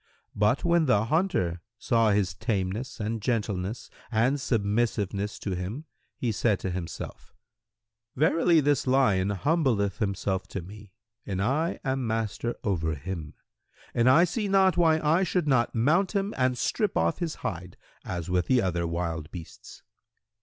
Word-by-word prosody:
[FN#110] -, -, -20 dB
But 105 Hz, +6 st, +2 dB
when 170 Hz, -1 st, +3 dB
the 110 Hz, -3 st, +3 dB
hunter 115 Hz, -, 0 dB, 0.2 s
saw 115 Hz, -2 st, +2 dB
his 100 Hz, -4 st, +1 dB
tameness 105 Hz, +7 st, -3 dB
and 110 Hz, +1 st, -2 dB
gentleness 105 Hz, -2 st, -2 dB, 0.2 s
and 125 Hz, +5 st, +2 dB
submissiveness 105 Hz, -3 st, 0 dB
to 100 Hz, -, -4 dB
him, 95 Hz, -, -5 dB, 0.3 s
he 120 Hz, -, -1 dB
said 105 Hz, -1 st, +1 dB
to 95 Hz, -, -2 dB
himself, 90 Hz, -2 st, -7 dB, 0.8 s
'Verily 165 Hz, +3 st, +4 dB
this 145 Hz, -2 st, +1 dB
lion 105 Hz, -8 st, +3 dB
humbleth 115 Hz, -, +1 dB
himself 95 Hz, -2 st, -1 dB
to 95 Hz, -, -5 dB
me 105 Hz, +2 st, -12 dB, 0.3 s
and 95 Hz, -2 st, -4 dB
I 140 Hz, -, 0 dB
am 130 Hz, -2 st, -1 dB
master 115 Hz, +1 st, -2 dB
of 95 Hz, -6 st, 0 dB
him, 80 Hz, 0 st, -4 dB, 0.6 s
and 120 Hz, +1 st, +3 dB
I 155 Hz, +7 st, +7 dB
see 205 Hz, +4 st, -1 dB
not 190 Hz, -1 st, +4 dB
why 160 Hz, -2 st, +4 dB
I 155 Hz, +4 st, +2 dB
should 180 Hz, -3 st, 0 dB
not 125 Hz, -4 st, +2 dB
mount 165 Hz, -, +2 dB
him 200 Hz, +1 st, 0 dB
and 130 Hz, -1 st, +1 dB
strip 210 Hz, -, 0 dB
off 85 Hz, 0 st, +1 dB
his 165 Hz, -3 st, -2 dB
hide, 90 Hz, 0 st, -5 dB, 0.3 s
as 90 Hz, -2 st, -4 dB
with 90 Hz, -1 st, 0 dB
the 130 Hz, -, +4 dB
other 85 Hz, -5 st, 0 dB
wild 85 Hz, -2 st, -3 dB
beasts.' 85 Hz, -3 st, -11 dB
110 Hz, 155 wpm, -27 LUFS, 95-140 Hz, 0.8 s, I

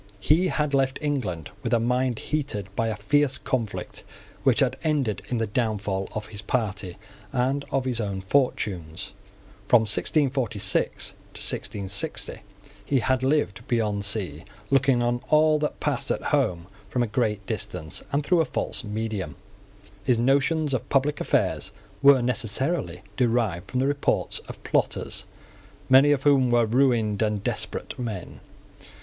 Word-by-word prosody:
He 160 Hz, -, +3 dB
had 150 Hz, -4 st, -1 dB
left 135 Hz, -1 st, +2 dB
England 120 Hz, -, -2 dB
with -, -, +1 dB
a -, -, +3 dB
mind 125 Hz, +1 st, +1 dB
heated 105 Hz, -11 st, -3 dB
by 115 Hz, -, +1 dB
a 110 Hz, -, -1 dB
fierce 135 Hz, +5 st, +2 dB
conflict 115 Hz, -6 st, -3 dB, 0.4 s
which -, -, +3 dB
had -, -, +2 dB
ended 140 Hz, -, 0 dB
in 125 Hz, -, 0 dB
the 115 Hz, -, +1 dB
downfall 105 Hz, -3 st, -1 dB
of 105 Hz, 0 st, -4 dB
his 100 Hz, -2 st, -7 dB
party 100 Hz, -5 st, -2 dB, 0.3 s
and 135 Hz, +2 st, 0 dB
of 135 Hz, -1 st, 0 dB
his 120 Hz, -3 st, -1 dB
own 100 Hz, -2 st, -3 dB
fortunes. 95 Hz, -, -1 dB, 0.5 s
From 120 Hz, +1 st, +6 dB
1646 110 Hz, -, 0 dB
to -, -, -15 dB
1660 100 Hz, -1 st, -3 dB, 0.4 s
he 140 Hz, -, +1 dB
had 130 Hz, +1 st, +1 dB
lived 130 Hz, -4 st, 0 dB
beyond 110 Hz, -5 st, 0 dB
sea, 95 Hz, -7 st, -2 dB, 0.3 s
looking 135 Hz, -2 st, +4 dB
on 120 Hz, 0 st, 0 dB
all 155 Hz, 0 st, +5 dB
that 150 Hz, -, -2 dB
passed -, -, -1 dB
at -, -, -1 dB
home 85 Hz, -1 st, +1 dB, 0.2 s
from 125 Hz, +3 st, +1 dB
a -, -, +1 dB
great 105 Hz, -2 st, -1 dB
distance, 80 Hz, -4 st, -4 dB
and 145 Hz, +1 st, +1 dB
through 175 Hz, +1 st, +4 dB
a -, -, +1 dB
false -, -, -2 dB
medium. 105 Hz, -3 st, -3 dB, 0.7 s
His 120 Hz, +2 st, +3 dB
notions 140 Hz, +5 st, +2 dB
of 130 Hz, +1 st, -2 dB
public 145 Hz, +2 st, +1 dB
affairs -, -, 0 dB, 0.3 s
were 140 Hz, -3 st, +7 dB
necessarily 120 Hz, -, -1 dB
derived 115 Hz, -8 st, +1 dB
from 130 Hz, -, -1 dB
the 130 Hz, -, +2 dB
reports 145 Hz, 0 st, 0 dB
of -, -, -10 dB
plotters, -, -, -1 dB, 0.6 s
many 135 Hz, +3 st, +7 dB
of 140 Hz, -2 st, +1 dB
whom 135 Hz, -3 st, +4 dB
were 120 Hz, -1 st, +4 dB
ruined 115 Hz, -3 st, +2 dB
and 105 Hz, -2 st, 0 dB
desperate -, -, -3 dB
men. 110 Hz, -8 st, -5 dB
120 Hz, 150 wpm, -25 LUFS, 105-135 Hz, 0.7 s, were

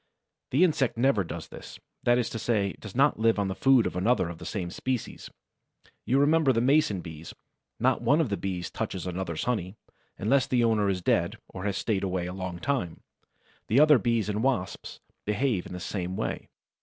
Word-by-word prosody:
The 145 Hz, +8 st, +3 dB
insect 150 Hz, -9 st, +2 dB
never 120 Hz, -5 st, +3 dB
does 85 Hz, -, -7 dB
this; -, -, -11 dB, 0.2 s
that 120 Hz, 0 st, +3 dB
is 120 Hz, -2 st, 0 dB
to 115 Hz, -, -4 dB
say, 105 Hz, -4 st, +1 dB
it -, -, -15 dB
does 105 Hz, -3 st, -10 dB
not 140 Hz, -2 st, +3 dB
live 115 Hz, 0 st, +3 dB
on 100 Hz, -1 st, 0 dB
the -, -, -1 dB
food 130 Hz, +2 st, +4 dB
of -, -, -3 dB
another 95 Hz, -1 st, +1 dB
of 85 Hz, -1 st, -8 dB
the -, -, -7 dB
same 90 Hz, -4 st, -4 dB
species. 130 Hz, +2 st, -4 dB, 0.8 s
You 130 Hz, -, +3 dB
remember 150 Hz, 0 st, +4 dB
the 115 Hz, -, +1 dB
Mason 130 Hz, -, +2 dB
bees: 80 Hz, -1 st, -9 dB, 0.4 s
not -, -, +2 dB
one 145 Hz, -, +3 dB
of 155 Hz, -7 st, +1 dB
the 100 Hz, -, 0 dB
Bees 90 Hz, -3 st, -4 dB
touches 95 Hz, -, -4 dB
another's 90 Hz, -2 st, -3 dB
honey, 105 Hz, -6 st, -2 dB, 0.4 s
unless 130 Hz, +7 st, +2 dB
the 125 Hz, -2 st, +2 dB
owner 110 Hz, -3 st, +2 dB
is 90 Hz, -2 st, -2 dB
dead -, -, +1 dB
or 95 Hz, -, -7 dB
has 100 Hz, -2 st, -1 dB
stayed 100 Hz, -4 st, -1 dB
away 90 Hz, -2 st, -1 dB
a 90 Hz, -, -5 dB
long 95 Hz, -2 st, -5 dB
time. 95 Hz, -5 st, -2 dB, 0.7 s
The 115 Hz, -, +3 dB
other 150 Hz, -3 st, +7 dB
Bees 115 Hz, -1 st, 0 dB
and 105 Hz, 0 st, -1 dB
Wasps 120 Hz, -8 st, -2 dB, 0.2 s
behave 105 Hz, -2 st, 0 dB
in -, -, -9 dB
the 90 Hz, -, -5 dB
same 90 Hz, 0 st, -4 dB
way. -, -, -4 dB
105 Hz, 205 wpm, -27 LUFS, 95-130 Hz, 0.8 s, other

